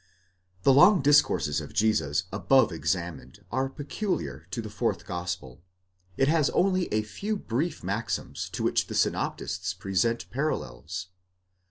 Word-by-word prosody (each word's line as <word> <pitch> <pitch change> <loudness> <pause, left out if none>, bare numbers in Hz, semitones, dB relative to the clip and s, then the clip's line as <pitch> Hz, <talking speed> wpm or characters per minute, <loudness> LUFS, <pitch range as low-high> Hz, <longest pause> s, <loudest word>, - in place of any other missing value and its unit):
The 135 - +6
long 180 +4 +7
discourses 145 +1 +3
of - - -10
Jesus 90 -9 +2
above 130 +5 +4
examined 85 0 -3
are 130 +2 0
peculiar 145 - -4
to 105 - -4
the 110 -2 -5
fourth 115 +2 -1
gospel; 85 -8 -5 0.6
it 135 - +3
has 155 -1 +3
only 185 -1 +1
a 110 0 +1
few 205 - -3
brief 150 - -2
maxims 100 +5 -3
to - - -3
which - - +1
the - - -5
synoptists 90 +1 -1
present 95 +5 0
parallels. 90 - -3
110 Hz, 135 wpm, -27 LUFS, 90-140 Hz, 0.6 s, long